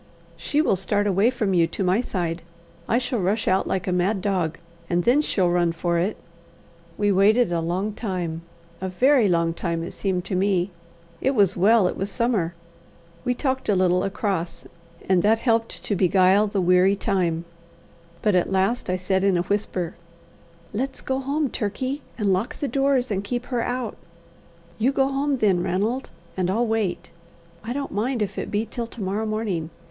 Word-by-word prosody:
"She 300 Hz, +1 st, 0 dB
will 200 Hz, -, +3 dB
start 205 Hz, +2 st, 0 dB
away 200 Hz, +3 st, +3 dB
from 215 Hz, -6 st, -1 dB
you 170 Hz, -2 st, +4 dB
to 185 Hz, -, -3 dB
my 185 Hz, +5 st, +2 dB
side; 175 Hz, -7 st, -3 dB, 0.5 s
I 230 Hz, -, +3 dB
shall 250 Hz, -1 st, -1 dB
rush 200 Hz, +4 st, 0 dB
out 190 Hz, +1 st, +2 dB
like 185 Hz, -1 st, -1 dB
a 185 Hz, -, -1 dB
mad 185 Hz, +3 st, +1 dB
dog, 180 Hz, -5 st, -1 dB, 0.3 s
and 175 Hz, 0 st, +1 dB
then 255 Hz, -, +4 dB
she'll 185 Hz, -11 st, +1 dB
run 175 Hz, -1 st, +2 dB
for 170 Hz, 0 st, 0 dB
it." 190 Hz, +5 st, -1 dB, 0.8 s
We 205 Hz, -1 st, +2 dB
waited 200 Hz, +2 st, +4 dB
a 170 Hz, -1 st, 0 dB
long 185 Hz, +6 st, -2 dB
time 180 Hz, -7 st, -3 dB, 0.4 s
a 190 Hz, -, -2 dB
very 250 Hz, +4 st, +4 dB
long 170 Hz, -2 st, +2 dB
time, 170 Hz, -1 st, -2 dB
it 170 Hz, -, -6 dB
seemed 185 Hz, -2 st, -2 dB
to 190 Hz, -, -4 dB
me. 190 Hz, 0 st, +1 dB, 0.5 s
It 270 Hz, +1 st, +1 dB
was 200 Hz, -3 st, +4 dB
well 205 Hz, +3 st, +4 dB
it -, -, -2 dB
was 195 Hz, +1 st, -3 dB
summer. 210 Hz, -7 st, 0 dB, 0.7 s
We 250 Hz, -1 st, 0 dB
talked 265 Hz, -2 st, -2 dB
a 205 Hz, -, +4 dB
little 180 Hz, -1 st, +2 dB
across, 195 Hz, -4 st, -2 dB, 0.4 s
and 185 Hz, -2 st, +4 dB
that 215 Hz, +3 st, +4 dB
helped 225 Hz, -1 st, 0 dB
to 205 Hz, -, -1 dB
beguile 190 Hz, +2 st, +4 dB
the 200 Hz, -1 st, -1 dB
weary 180 Hz, +2 st, +4 dB
time; 180 Hz, -5 st, -1 dB, 0.8 s
but 210 Hz, -, +3 dB
at 180 Hz, 0 st, +2 dB
last 195 Hz, +5 st, +1 dB
I 180 Hz, -, +1 dB
said 190 Hz, +1 st, 0 dB
in 195 Hz, -2 st, +3 dB
a 175 Hz, -, +1 dB
whisper: 185 Hz, -3 st, -2 dB, 0.8 s
"Let's 265 Hz, +5 st, -3 dB
go 265 Hz, 0 st, -1 dB
home, 285 Hz, +3 st, 0 dB
Turkey, 255 Hz, +7 st, -3 dB, 0.2 s
and 205 Hz, -4 st, +2 dB
lock 190 Hz, +6 st, -2 dB
the 285 Hz, -, -1 dB
doors, 270 Hz, -1 st, +1 dB
and 195 Hz, -1 st, -1 dB
keep 245 Hz, +4 st, -3 dB
her 240 Hz, -, +1 dB
out." 245 Hz, -2 st, -3 dB, 0.8 s
"You 245 Hz, +5 st, +3 dB
go 270 Hz, -1 st, +2 dB
home 275 Hz, +1 st, 0 dB
then, 200 Hz, -8 st, +2 dB
Ranald, 205 Hz, +9 st, -1 dB, 0.3 s
and 185 Hz, -1 st, 0 dB
I'll 225 Hz, +6 st, +1 dB
wait. 220 Hz, -5 st, -2 dB, 0.5 s
I 225 Hz, -, -5 dB
don't 280 Hz, +2 st, -3 dB
mind 230 Hz, +3 st, 0 dB
if 200 Hz, -, -4 dB
it -, -, -4 dB
be 210 Hz, +2 st, 0 dB
till 235 Hz, +1 st, -5 dB
to 235 Hz, -, -9 dB
morrow 205 Hz, +4 st, -1 dB
morning. 210 Hz, -7 st, -2 dB
200 Hz, 185 wpm, -24 LUFS, 180-235 Hz, 0.8 s, you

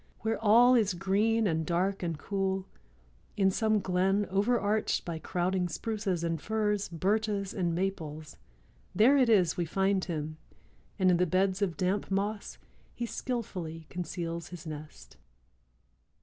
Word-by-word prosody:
Where 225 Hz, 0 st, -2 dB
all 235 Hz, +4 st, +6 dB
is 210 Hz, -6 st, +3 dB
green 215 Hz, +5 st, +1 dB
and 160 Hz, -4 st, +1 dB
dark 180 Hz, +4 st, 0 dB
and 165 Hz, -3 st, -2 dB
cool, 195 Hz, +1 st, -2 dB, 0.7 s
in 195 Hz, -1 st, +4 dB
some 215 Hz, +1 st, +2 dB
glen 190 Hz, +2 st, +1 dB
overarched 210 Hz, +1 st, +1 dB
by 165 Hz, -2 st, -4 dB
crowding 180 Hz, +3 st, -1 dB
spruces 195 Hz, -1 st, -2 dB
and 165 Hz, -2 st, -1 dB
firs, 210 Hz, -2 st, -1 dB
birches 200 Hz, +3 st, -1 dB
and 175 Hz, -3 st, -1 dB
maples, 160 Hz, -5 st, -4 dB, 0.6 s
there 230 Hz, +9 st, +6 dB
it 260 Hz, -4 st, +4 dB
is 185 Hz, -6 st, +4 dB
we 175 Hz, -, 0 dB
find 190 Hz, +3 st, +1 dB
him 155 Hz, -2 st, -4 dB, 0.6 s
and 185 Hz, -1 st, +4 dB
in 175 Hz, -, +3 dB
the 180 Hz, +1 st, +2 dB
beds 190 Hz, +3 st, +1 dB
of 185 Hz, -5 st, 0 dB
damp 190 Hz, +2 st, 0 dB
moss 200 Hz, +2 st, -2 dB, 0.4 s
he 240 Hz, -, -3 dB
skillfully 180 Hz, -11 st, -4 dB
conceals 170 Hz, -2 st, -4 dB
his 175 Hz, -2 st, -10 dB
nest." 155 Hz, -1 st, -9 dB
190 Hz, 140 wpm, -30 LUFS, 170-210 Hz, 0.7 s, all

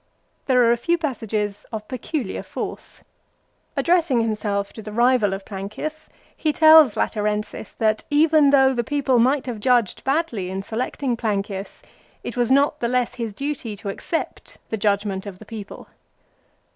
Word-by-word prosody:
There 250 Hz, -2 st, +4 dB
are 230 Hz, -, +4 dB
a 235 Hz, -, +2 dB
few 340 Hz, +8 st, +1 dB
passages 220 Hz, -9 st, -3 dB
of 215 Hz, -2 st, -6 dB
peculiar 255 Hz, -2 st, -4 dB
force. -, -, -7 dB, 0.7 s
Addressing 335 Hz, -8 st, +3 dB
himself 210 Hz, -2 st, -2 dB
to 220 Hz, -, -9 dB
the 215 Hz, -, -8 dB
rival 240 Hz, -2 st, +3 dB
of 195 Hz, 0 st, -5 dB
Plancius, 215 Hz, +11 st, -6 dB, 0.3 s
he 310 Hz, -, 0 dB
tells 315 Hz, -5 st, +7 dB
Laterensis 210 Hz, 0 st, -2 dB
that 215 Hz, -1 st, +1 dB
even 300 Hz, 0 st, +4 dB
though 270 Hz, -1 st, +5 dB
the 240 Hz, -1 st, -1 dB
people 265 Hz, -1 st, +1 dB
might 260 Hz, +4 st, +2 dB
have 240 Hz, -4 st, -5 dB
judged 240 Hz, -3 st, +1 dB
badly 265 Hz, -, -1 dB
in 190 Hz, +1 st, -4 dB
selecting 245 Hz, +4 st, -2 dB
Plancius, 200 Hz, -3 st, -3 dB, 0.4 s
it -, -, -5 dB
was 245 Hz, 0 st, +1 dB
not 285 Hz, +2 st, +3 dB
the 235 Hz, -, 0 dB
less 250 Hz, 0 st, 0 dB
his 230 Hz, -3 st, -4 dB
duty 270 Hz, -2 st, -4 dB
to 200 Hz, -, -6 dB
accept 325 Hz, +11 st, -5 dB
the -, -, -1 dB
judgment 205 Hz, -2 st, -1 dB
of 190 Hz, -2 st, -8 dB
the -, -, -13 dB
people. 215 Hz, -3 st, -9 dB
235 Hz, 160 wpm, -22 LUFS, 210-275 Hz, 0.7 s, tells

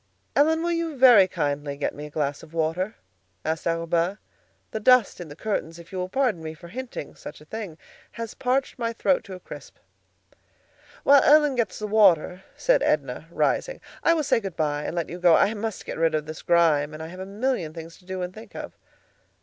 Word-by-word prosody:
"Ellen, 320 Hz, +3 st, +3 dB
will 345 Hz, -, 0 dB
you 335 Hz, -3 st, -2 dB
very 245 Hz, -7 st, +8 dB
kindly 145 Hz, -5 st, -2 dB
get 145 Hz, -, -2 dB
me 150 Hz, +1 st, -7 dB
a -, -, -12 dB
glass 145 Hz, -1 st, -2 dB
of 160 Hz, -, -14 dB
water?" 165 Hz, +6 st, -1 dB, 0.5 s
asked 160 Hz, +1 st, -2 dB
Arobin. 170 Hz, +3 st, 0 dB, 0.5 s
"The 220 Hz, -, -3 dB
dust 245 Hz, -4 st, +4 dB
in 175 Hz, -, -7 dB
the 145 Hz, -, -10 dB
curtains, 165 Hz, -4 st, -3 dB
if 170 Hz, -1 st, -14 dB
you 190 Hz, -, -4 dB
will 180 Hz, 0 st, -3 dB
pardon 245 Hz, -6 st, 0 dB
me 160 Hz, 0 st, -6 dB
for 170 Hz, +2 st, -13 dB
hinting 255 Hz, -, -7 dB
such 150 Hz, -, -10 dB
a 150 Hz, -, -16 dB
thing, 200 Hz, -3 st, -7 dB, 0.4 s
has 230 Hz, -1 st, -6 dB
parched 265 Hz, +1 st, -1 dB
my 230 Hz, -1 st, -1 dB
throat 270 Hz, +4 st, +1 dB
to 190 Hz, -, -8 dB
a -, -, -10 dB
crisp." -, -, -11 dB, 1.3 s
"While 280 Hz, -1 st, +7 dB
Ellen 295 Hz, -1 st, +5 dB
gets 235 Hz, -6 st, -1 dB
the 215 Hz, -, -4 dB
water," 195 Hz, -4 st, +3 dB
said -, -, +3 dB
Edna, -, -, -1 dB
rising, -, -, 0 dB, 0.2 s
"I 335 Hz, -, +4 dB
will 315 Hz, -, 0 dB
say 260 Hz, -4 st, +2 dB
good 195 Hz, -6 st, -6 dB
by 150 Hz, -2 st, -1 dB
and -, -, -4 dB
let 170 Hz, -2 st, -1 dB
you 175 Hz, -, -7 dB
go. 175 Hz, -2 st, +6 dB
I 210 Hz, -, +3 dB
must 220 Hz, -1 st, -5 dB
get -, -, -6 dB
rid 165 Hz, -1 st, +2 dB
of 155 Hz, -1 st, -1 dB
this 155 Hz, 0 st, -8 dB
grime, 155 Hz, -3 st, +3 dB
and 155 Hz, -, -7 dB
I -, -, -6 dB
have 180 Hz, +2 st, -10 dB
a 190 Hz, -, -5 dB
million 205 Hz, -5 st, -1 dB
things 165 Hz, +1 st, -10 dB
to 180 Hz, -, -23 dB
do 185 Hz, 0 st, -4 dB
and 180 Hz, 0 st, -5 dB
think 220 Hz, +3 st, -13 dB
of." -, -, -7 dB
185 Hz, 215 wpm, -25 LUFS, 160-235 Hz, 1.3 s, very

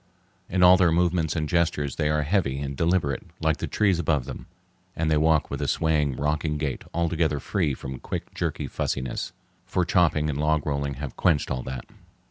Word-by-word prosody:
In 90 Hz, 0 st, +2 dB
all 90 Hz, +1 st, +8 dB
their 90 Hz, -2 st, +4 dB
movements 85 Hz, -2 st, +1 dB
and 80 Hz, -2 st, -1 dB
gestures 80 Hz, -5 st, 0 dB
they 75 Hz, -, +1 dB
are 75 Hz, 0 st, +1 dB
heavy 75 Hz, -5 st, 0 dB
and 70 Hz, 0 st, -4 dB
deliberate 85 Hz, -3 st, +1 dB, 0.2 s
like 80 Hz, -1 st, +1 dB
the -, -, -3 dB
trees 95 Hz, -5 st, +2 dB
above 75 Hz, -6 st, +1 dB
them, 65 Hz, -, -8 dB, 0.5 s
and 80 Hz, -1 st, 0 dB
they 75 Hz, -, +4 dB
walk 80 Hz, 0 st, +2 dB
with -, -, -3 dB
a -, -, -1 dB
swaying, 75 Hz, -4 st, +1 dB
rocking 75 Hz, +2 st, -1 dB
gait 75 Hz, -3 st, -3 dB
altogether 80 Hz, -3 st, 0 dB
free 80 Hz, -2 st, -1 dB
from 65 Hz, -1 st, -7 dB
quick, -, -, -5 dB
jerky -, -, -2 dB
fussiness, 65 Hz, -2 st, -3 dB, 0.3 s
for 90 Hz, -1 st, 0 dB
chopping 85 Hz, -3 st, +2 dB
and 75 Hz, -2 st, -2 dB
log 75 Hz, -1 st, +1 dB
rolling 70 Hz, -1 st, -1 dB
have 70 Hz, -1 st, -6 dB
quenched 80 Hz, -6 st, +2 dB
all 65 Hz, -, -1 dB
that. 65 Hz, -1 st, -6 dB
75 Hz, 190 wpm, -25 LUFS, 70-85 Hz, 0.5 s, all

